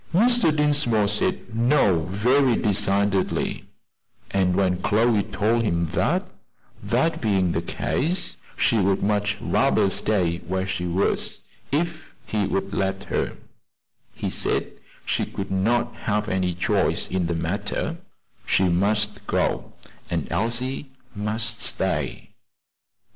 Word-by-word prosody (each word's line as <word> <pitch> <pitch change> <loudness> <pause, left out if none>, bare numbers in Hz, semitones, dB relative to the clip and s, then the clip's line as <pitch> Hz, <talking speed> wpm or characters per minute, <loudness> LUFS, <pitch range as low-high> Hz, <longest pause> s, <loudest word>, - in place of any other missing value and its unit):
Mr. 240 -1 +5
Dinsmore 145 -8 +3
said 105 +2 -1
"No," 115 - +3
very 125 +6 +3
decidedly; 100 -2 +1 0.7
and 95 -2 +2
when 90 -2 +1
Chloe 110 +1 +3
told 105 +3 0
him 85 -7 0
that - - 0 0.5
that 165 0 0
being 95 -5 +2
the - - -1
case, 175 +4 -1 0.2
she 115 - +2
would 95 0 +1
much 105 +1 0
rather 95 - +2
stay 90 -6 +1
where 95 +2 -3
she 95 -2 -3
was, 95 +4 0 0.3
if 160 +1 -2
he 105 -2 -1
would 95 0 -2
let 95 0 -1
her, - - -1 0.8
he - - -3
said - - -1 0.3
she - - 0
could 100 -1 -5
not 120 +5 +1
have 105 0 -1
any 95 -4 0
choice 90 - +1
in 90 -2 -1
the 85 - -1
matter; 85 +4 -2 0.5
she 95 -1 +3
must 105 +3 0
go, - - -1 0.4
and - - -2
Elsie 125 +5 -1 0.2
must 110 +1 -1
stay. - - -1
105 Hz, 120 wpm, -24 LUFS, 95-115 Hz, 0.8 s, Mr